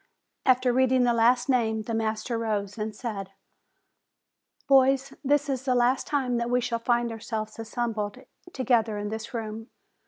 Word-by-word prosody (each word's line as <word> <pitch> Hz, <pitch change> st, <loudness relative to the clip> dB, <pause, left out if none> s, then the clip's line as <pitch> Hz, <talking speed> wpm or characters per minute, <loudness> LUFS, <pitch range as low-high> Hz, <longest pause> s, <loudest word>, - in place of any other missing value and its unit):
After 255 Hz, -1 st, +4 dB
read 260 Hz, 0 st, +3 dB
ing 260 Hz, -1 st, +4 dB
the 240 Hz, -1 st, +3 dB
last 240 Hz, +2 st, +3 dB
name, 225 Hz, -4 st, +1 dB
the 230 Hz, -, -4 dB
master 220 Hz, +1 st, -1 dB
rose 210 Hz, -3 st, -2 dB
and 215 Hz, 0 st, -3 dB
said: 200 Hz, -5 st, -5 dB, 1.3 s
"Boys, 270 Hz, 0 st, +4 dB
this 290 Hz, +1 st, +2 dB
is 265 Hz, -3 st, -1 dB
the 255 Hz, -2 st, +1 dB
last 245 Hz, +2 st, +2 dB
time 260 Hz, -4 st, 0 dB
that 235 Hz, 0 st, -1 dB
we 250 Hz, 0 st, +3 dB
shall 235 Hz, -1 st, -2 dB
find 240 Hz, 0 st, +1 dB
our 225 Hz, -, -7 dB
selves 220 Hz, -1 st, -5 dB
assembled 225 Hz, -2 st, -3 dB, 0.3 s
together 235 Hz, -6 st, +1 dB
in 205 Hz, 0 st, -3 dB
this 220 Hz, +1 st, -6 dB
room. 225 Hz, -1 st, -5 dB
235 Hz, 165 wpm, -27 LUFS, 220-255 Hz, 1.3 s, After